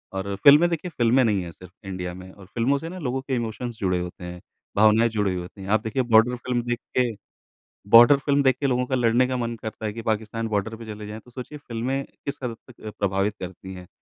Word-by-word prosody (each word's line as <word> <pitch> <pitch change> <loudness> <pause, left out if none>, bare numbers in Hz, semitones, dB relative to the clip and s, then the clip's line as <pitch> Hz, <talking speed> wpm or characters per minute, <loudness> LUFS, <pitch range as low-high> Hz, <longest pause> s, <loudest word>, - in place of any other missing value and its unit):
और 100 +1 -3
फ़िल्में 150 +5 +8
देखिए 170 +1 -3
फ़िल्में 120 +2 +4
नहीं 105 -5 +1
हैं 85 - -7
सिर्फ़ 90 +1 -15 0.2
इंडिया 90 -2 -4
में 95 +1 -11
और 95 -1 -15
फ़िल्मों 120 +7 0
से 165 +3 -6
ना 185 +1 -8
लोगों 130 -3 -2
के 135 -1 -2
इमोशन्स 120 0 -4
जुड़े 90 -2 0
होते 90 0 -7
हैं, 90 0 -7 0.4
भावनाएँ 110 +2 +5
जुड़ी 105 -3 0
हुई 90 - -3
होती 95 +3 -11
हैं। 95 - -7
आप 110 +1 +3
देखिए, 115 +4 -1
बॉर्डर 115 +1 +4
फ़िल्म 125 0 -2
देख 120 0 -1 0.2
के 125 - +1 0.8
बॉर्डर 120 +5 +9
फ़िल्म 140 0 +1
देख 130 -2 +3
के 140 - +1
लोगों 125 -1 +1
का 130 - -2
लड़ने 120 0 +3
का 130 - -1
मन 120 -1 -2
करता 110 0 -5
है 105 - -2
कि 115 +1 -7
पाकिस्तान 110 +1 -2
बॉर्डर 110 +1 -2
पे 115 0 -10
चले 105 -1 -7
जाएँ। 110 +1 -7
तो 125 - -19
सोचिए, 130 +4 -8
फ़िल्में 130 +2 -3 0.2
किस 140 0 -4
हद 115 -2 -3
तक 120 - -17
अ, - - -3
प्रभावित 100 +1 0
करती 95 +1 -8
हैं 90 -1 -10
115 Hz, 245 wpm, -24 LUFS, 100-125 Hz, 0.8 s, बॉर्डर